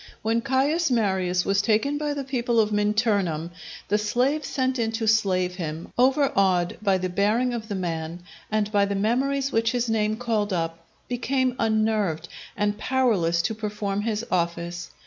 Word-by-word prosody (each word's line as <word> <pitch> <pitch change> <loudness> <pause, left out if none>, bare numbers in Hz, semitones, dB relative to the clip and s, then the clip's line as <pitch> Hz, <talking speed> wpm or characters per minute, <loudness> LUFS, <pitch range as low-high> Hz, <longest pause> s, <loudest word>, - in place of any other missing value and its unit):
When 225 +1 +1
Caius 285 +7 +1
Marius 190 -6 +1
was 200 +1 +2
taken 240 +7 +1
by 295 -1 -2
the 280 - -3
people 245 -3 0
of 215 -1 +2
Minturnum, 205 -6 +1 0.4
the 210 +2 +2
slave 255 +8 +1
sent 260 -2 -1
in 225 -1 0
to 225 0 -2
slay 195 -4 +3
him, 170 -3 -6
overawed 200 - +2
by 195 -3 +2
the 185 0 -2
bearing 210 +7 +1
of 225 -2 -4
the 205 - -3
man, 170 -1 -4 0.3
and 210 -1 0
by 200 -1 +3
the 200 0 -2
memories 270 +7 0
which 225 0 +1
his 240 -2 0
name 215 -1 +1
called 220 -4 -1
up, 165 -2 -3 0.2
became 255 +1 0
unnerved, 215 -7 0 0.3
and 205 0 0
powerless 200 -12 +1
to 220 - -1
perform 210 -2 -3
his 220 +1 -2
office. 170 0 -2
215 Hz, 165 wpm, -25 LUFS, 185-245 Hz, 0.4 s, slay